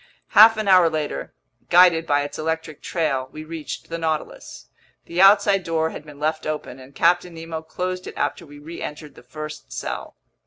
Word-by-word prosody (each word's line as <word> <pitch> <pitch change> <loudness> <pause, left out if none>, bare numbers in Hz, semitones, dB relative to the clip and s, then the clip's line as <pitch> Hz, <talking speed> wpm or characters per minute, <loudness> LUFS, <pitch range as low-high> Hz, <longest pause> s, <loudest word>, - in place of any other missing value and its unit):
Half 220 +1 +8
an 215 -1 -2
hour 185 -3 +6
later, 150 - -4 0.4
guided 170 -2 +5
by 145 0 +2
its 145 - -7
electric 160 -1 -3
trail, 135 -6 -1
we 155 - -8
reached 160 -1 -7
the 165 0 -4
Nautilus. 160 -2 -4 0.4
The 175 +2 -1
outside 200 -1 +5
door 160 -1 -1
had - - -8
been 145 -1 -12
left 155 +1 -1
open, 150 -4 -5
and 130 +2 -15
Captain 175 0 +2
Nemo 165 0 -6
closed 180 +3 -5
it - - -9
after - - -2
we 145 -2 -13
reentered 150 -1 -8
the - - -15
first 155 +4 -9
cell. - - -6
160 Hz, 180 wpm, -22 LUFS, 150-175 Hz, 0.4 s, Half